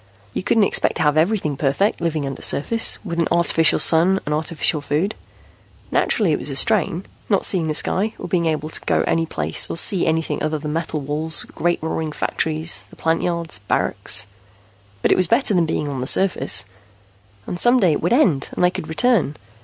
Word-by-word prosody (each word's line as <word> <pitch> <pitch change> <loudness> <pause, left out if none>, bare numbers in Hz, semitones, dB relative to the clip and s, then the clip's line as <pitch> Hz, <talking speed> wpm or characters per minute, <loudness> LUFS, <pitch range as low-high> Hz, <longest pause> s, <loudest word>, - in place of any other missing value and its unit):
You - - -3
couldn't 220 +3 +2
expect - - +1
to - - -1
have 150 -1 +2
everything 160 -2 0
perfect, 145 +10 -1
living 160 -3 -2
undersurface, 145 +10 +1
with 170 -3 -4
an 165 - +1
artificial 170 -2 +3
sun 175 +4 +4
and 150 - -2
artificial 155 0 -1
food. 155 +9 -2 0.8
Naturally 205 -7 +1
it 150 - 0
was - - -3
a 135 - -4
strain, 185 +2 +2 0.2
not 200 - +1
seeing 175 -5 +1
the 155 - -2
sky 210 +7 +1
or - - -7
being 170 -3 0
able 155 0 -3
to - - +3
go - - +1
any 165 0 0
place 80 - +1
or - - -4
see 185 +1 +2
anything 160 0 -1
other 155 0 -1
than 150 0 -5
metal 160 -2 -3
walls, 150 +3 0
great 175 0 -2
roaring 160 -1 -3
factories, 160 +2 -3
the - - -16
plant 165 0 -1
yards, 170 -8 -3
barracks. - - 0 0.8
But - - +2
it - - +3
was 185 - +3
better 230 +1 +1
than 175 -3 +1
being 150 -1 -2
on 135 -3 -4
surface. 105 - +2 0.8
And 175 - -4
some 245 +4 +6
day 185 -7 +3
it 150 - -2
would 175 - -1
end 195 - +2
and - - -2
they 180 - +4
could 160 - -7
return. 180 - +1
165 Hz, 195 wpm, -20 LUFS, 150-185 Hz, 0.8 s, some